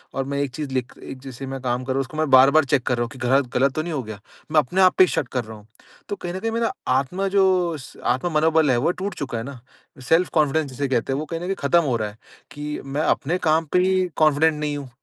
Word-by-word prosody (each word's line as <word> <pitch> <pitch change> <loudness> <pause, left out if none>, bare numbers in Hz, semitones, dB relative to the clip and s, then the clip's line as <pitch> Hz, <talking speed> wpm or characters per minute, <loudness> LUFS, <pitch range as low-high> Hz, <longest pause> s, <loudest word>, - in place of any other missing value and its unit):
और 135 - -1
मैं 140 +1 -3
एक 140 - -2
चीज़ 150 -3 -4
लिख 130 -1 -2
एक 135 - -8
जैसे 135 0 -8
मैं 135 0 -5
काम 125 0 -1
कर 130 - -4
रहा - - -4
हूँ - - +2
उसको 135 +4 -8
मैं 155 -2 0
बार-बार 135 +4 +6
चेक 135 -1 +1
कर 125 - +2
रहा - - -1
हूँ 120 - -5
कि 130 - -12
गलत 130 +2 +2
गलत 135 +1 +2
तो 155 - 0
नहीं 170 -1 -4
हो 135 - -2
गया। 110 -2 -8 0.3
मैं 160 - +1
अपने 180 +7 0
आप 185 - +5
पे - - +8
ही - - +4
शक 145 - -1
कर 125 -2 0
रहा 110 0 -10
हूँ। 105 +1 -18 0.4
तो 205 - -2
कहीं 175 -3 -6
न 185 - -4
कहीं 225 +3 -2
मेरा 230 0 -1
आत्मा 140 +10 0
जो 185 -4 +2
स 130 - -13
आत्म-मनोबल 155 +2 +2
है 125 - +2
वो 145 +8 +2
टूट 190 +3 -5
चुका 130 -5 -4
है 115 - -4
ना। 140 -1 -8 0.4
सेल्फ़-कॉन्फिडेंस 155 0 +2
जिसे 140 +2 -2
कहते 130 +1 0
हैं 135 - -1
वो 155 - -4
कहीं 165 +2 -5
न 175 - -7
कहीं 195 +1 -1
ख़त्म 170 +4 +3
हो 125 - +1
रहा 110 -1 -3
है 105 - -16 0.3
कि 150 +1 -5
मैं 140 +2 -2
अपने 175 +2 0
काम 160 +1 +3
पे 180 - +5
ही 185 0 +2
कॉन्फिडेंट 155 +1 +4
नहीं 150 -1 -2
हूँ। 140 -2 -8
145 Hz, 285 wpm, -22 LUFS, 130-165 Hz, 0.4 s, पे